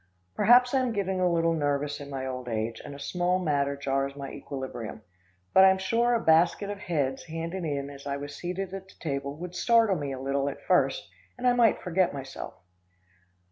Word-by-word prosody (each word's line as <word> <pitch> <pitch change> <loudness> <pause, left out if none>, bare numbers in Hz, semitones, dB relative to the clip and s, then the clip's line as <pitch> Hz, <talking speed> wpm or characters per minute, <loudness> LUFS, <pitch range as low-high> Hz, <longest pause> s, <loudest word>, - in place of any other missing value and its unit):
Perhaps 245 - +5
I'm 255 -3 +2
getting 190 -2 -1
a 180 -1 +3
little 165 0 +2
nervous 145 -1 -1
in 140 -1 -8
my 135 -1 -4
old 130 -1 -5
age, 110 0 -2
and 145 - -8
a - - -10
small 180 +4 0
matter 140 -5 0
jars 135 0 -1
my 140 -1 -6
equilibrium; 130 -6 -6 0.5
but 190 - +8
I'm 190 0 +6
sure 230 +5 +2
a - - +2
basket 170 +3 +3
of 205 - -6
heads 140 -8 -2
handed 165 +2 -4
in 140 -2 -3
as 140 0 -10
I 140 0 -2
was 145 0 -7
seated 185 +4 -4
at 190 0 -7
the - - -18
table 140 -2 -3
would 175 +1 -7
startle 225 0 +3
me 145 -2 -3
a 130 - -5
little 135 +1 0
at 140 - -9
first, - - +2 0.3
and 250 - -5
I 250 - +5
might 235 -2 +3
forget 180 -3 +1
myself. 135 -1 -7
160 Hz, 200 wpm, -28 LUFS, 140-190 Hz, 0.5 s, but